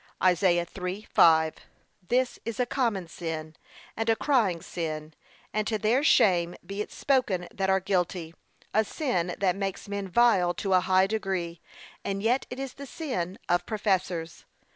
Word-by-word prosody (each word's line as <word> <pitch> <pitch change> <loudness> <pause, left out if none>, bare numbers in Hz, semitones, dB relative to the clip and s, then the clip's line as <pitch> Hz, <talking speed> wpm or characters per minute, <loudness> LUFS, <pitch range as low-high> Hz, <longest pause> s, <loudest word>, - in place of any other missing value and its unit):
(Isa. 180 -1 +3
3:5) 175 -4 +2 0.5
This 250 +1 +1
is 230 0 -5
a 250 - +3
common 230 -8 -1
sin, 160 -2 -5 0.4
and 225 +1 -1
a 225 - +5
crying 225 - +2
sin, 155 -2 -5 0.4
and 215 0 0
to 220 - 0
their 225 +7 +2
shame 175 - +4
be 200 +1 -4
it - - -5
spoken 210 -10 +1
that 190 0 -1
are 190 0 +4
guilty; 180 -3 -1 0.4
a 220 - +4
sin 185 - -1
that 185 -3 +1
makes 195 0 -4
men 200 -1 -3
vile 185 -4 +3
to 195 -2 -1
a 185 - +6
high 185 +1 +3
degree, 190 -5 -3 0.4
and 195 0 -3
yet 245 +4 +1
it 250 - -6
is 270 -1 -5
the 280 0 -9
sin 220 - -4
of 175 0 +1
professors. 190 -6 -1
190 Hz, 160 wpm, -27 LUFS, 175-220 Hz, 0.5 s, a